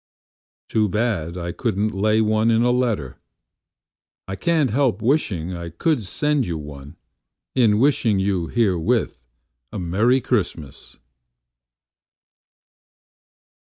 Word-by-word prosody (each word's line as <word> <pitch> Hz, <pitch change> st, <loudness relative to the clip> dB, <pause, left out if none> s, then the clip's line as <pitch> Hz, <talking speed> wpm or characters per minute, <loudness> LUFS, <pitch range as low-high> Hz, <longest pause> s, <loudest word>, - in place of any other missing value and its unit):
Too 110 Hz, -2 st, +1 dB
bad 95 Hz, -5 st, -1 dB
I 85 Hz, -1 st, -4 dB
couldn't 110 Hz, 0 st, -1 dB
lay 105 Hz, +3 st, +2 dB
one 110 Hz, +1 st, +2 dB
in 115 Hz, 0 st, +3 dB
a 125 Hz, -, +3 dB
letter.I 105 Hz, -, -6 dB
can't 150 Hz, -, +1 dB
help 125 Hz, -4 st, +1 dB
wishing 105 Hz, -, 0 dB
I 85 Hz, -1 st, -6 dB
could 135 Hz, -, 0 dB
send 145 Hz, +6 st, 0 dB
you 85 Hz, -2 st, -3 dB
one, 70 Hz, -2 st, -10 dB, 0.6 s
In 115 Hz, -5 st, +3 dB
wishing 120 Hz, -4 st, +2 dB
you 95 Hz, -3 st, 0 dB
herewith 95 Hz, -, 0 dB, 0.5 s
a -, -, -6 dB
Merry 105 Hz, +9 st, +2 dB
Christmas. 85 Hz, -, -3 dB
105 Hz, 105 wpm, -22 LUFS, 85-120 Hz, 0.6 s, in